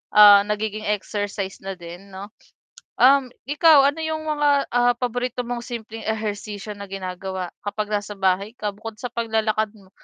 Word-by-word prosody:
ah, 205 -1 +10
nagiging 215 0 -2
exercise 205 -1 -3
na 195 0 -5
din 175 +3 -11
'no. 200 +2 -8 0.7
Um, 265 0 +6 0.2
ikaw 295 -1 +6
ano 290 +3 -3
yung 315 0 -3
mga, 295 -1 +1 0.2
ah, 245 0 +4
paborito 250 0 -2
mong 240 -1 -3
simpleng 225 -2 -7
ehersisyo 210 -1 -4
na 200 0 -8
ginagawa 185 -1 -5
kapag 210 +1 -3
nasa 205 0 -2
bahay 190 +2 +1
ka, 210 -3 -2
bukod 220 +1 -8
sa 245 - -3
paglalakad 220 -2 0
mo? 190 -2 -19
215 Hz, 155 wpm, -23 LUFS, 200-245 Hz, 0.7 s, ah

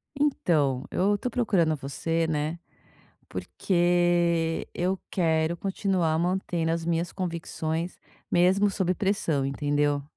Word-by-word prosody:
Então, 155 - +1
eu 205 +3 +2
tô 250 - -3
procurando 200 -10 +2
você, 165 +4 -2
né. 155 +2 -2 0.7
Porque 175 -2 +1
eu 185 +2 -1
quero 160 -2 +1
continuar 190 -3 0
mantendo 175 -2 0
as 165 0 -1
minhas 170 +1 0
convicções 170 -2 -3 0.3
mesmo 190 +4 +4
sob 185 -1 0
pressão, 190 -9 0
entendeu? 145 +1 0
170 Hz, 105 wpm, -27 LUFS, 160-185 Hz, 0.7 s, mesmo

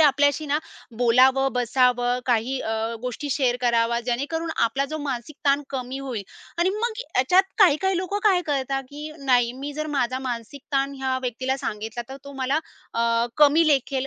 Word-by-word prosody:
आपल्याशी 290 0 +3
ना 290 +1 +1 0.4
बोलावं, 260 +3 +4
बसावं 245 0 +2
काही 245 +2 +1
अ, 220 - -3 0.3
गोष्टी 250 +3 -4
शेअर 255 -3 +1
करावा, 235 -1 +2
जेणेकरून 290 +7 -2
आपला 270 +4 0
जो 310 - -3
मानसिक 270 +1 -4
ताण 280 +1 +3
कमी 260 -1 -4
होईल 260 -6 -4 0.4
आणि 350 +2 +3
मग 465 +2 -1 0.2
ह्याच्यात 325 +10 +5 0.2
काही-काही 380 0 +4
लोकं 375 +3 -2
काय 380 -4 +5
करतात, 270 -2 -1
की 295 +2 -7
नाही, 245 -2 +3
मी 290 +1 -4
जर 305 +1 -4
माझा 260 -3 -1
मानसिक 250 +1 -5
ताण 275 0 +1
ह्या 265 -1 0
व्यक्तीला 255 +2 -2
सांगितला, 220 0 -4
तर 265 - -7
तो 280 - -9
मला 270 +4 +1 0.4
अ, 230 0 +2
कमी 300 +2 +5
लेखेल 270 -1 +1
270 Hz, 165 wpm, -24 LUFS, 245-290 Hz, 0.4 s, ह्याच्यात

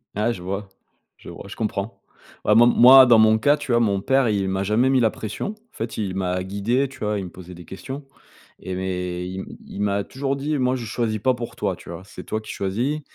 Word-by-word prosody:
Ah, 110 +3 +1
je 90 -6 -7
vois, 100 +1 -4 0.5
je - - -12
vois, - - -10
je - - -9
comprends 105 -1 -3 0.5
vraiment, 115 +3 +6
moi, 130 +2 +9
dans 115 -2 +6
mon 110 0 +5
cas, 145 +5 +3
tu 125 - -5
vois? 120 - +4
Mon 100 -3 +1
père, 135 +2 +2
il 100 -2 0
m'a 95 0 -1
jamais 110 +6 +2
mis 135 -1 +3
la 110 - +4
pression. 110 - -5
En 220 +1 -35
fait, 115 +1 -5
il 100 -4 -2
m'a 90 -1 -1
guidé, 110 +8 0
tu 130 - -15
vois? 105 -1 -1
Il 95 - -5
me 90 - -7
posait 90 +1 -11
des 85 - -12
questions, 130 +10 -8 0.5
et 95 - -5
mais 90 -1 -3
i 95 +1 -5 0.2
il 100 - -7
m'a 100 0 0
toujours 135 +1 -2
dit: 145 +2 -1
«Moi, 125 0 +2
je 120 - -6
choisis 110 -1 -2
pas 130 +5 +2
pour 120 -1 -6
toi», 100 -3 -1
tu - - -14
vois? 85 +1 -7
«C'est - - -10
toi 110 - -2
qui - - -8
choisis 120 +11 -2
110 Hz, 240 wpm, -23 LUFS, 95-125 Hz, 0.5 s, moi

